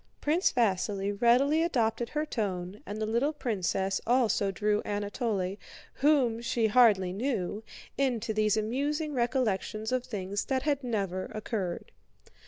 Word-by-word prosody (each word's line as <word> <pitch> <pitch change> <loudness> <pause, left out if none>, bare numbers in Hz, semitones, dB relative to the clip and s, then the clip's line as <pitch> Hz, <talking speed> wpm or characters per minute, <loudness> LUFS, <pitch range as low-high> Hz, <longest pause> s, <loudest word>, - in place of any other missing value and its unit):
Prince 320 +5 +2
Vasíli 200 -3 0
readily 270 +7 +4
adopted 240 -7 0
her 300 +1 -1
tone 195 -7 -3
and 210 +1 -5
the 215 - 0
little 235 +8 +1
princess 195 - -1
also 235 -5 +2
drew 210 +1 0
Anatole, 205 -2 -2 0.4
whom 265 -6 +2
she 235 -1 0
hardly 210 -5 +4
knew, 215 -2 -2 0.4
into 235 -5 0
these 215 0 +2
amusing 290 +8 -1
recollections 235 -4 -1
of 255 -1 0
things 200 -4 -3
that 265 -1 -1
had 285 -2 0
never 195 -6 -2
occurred. 205 -5 -4
220 Hz, 130 wpm, -29 LUFS, 200-255 Hz, 0.4 s, readily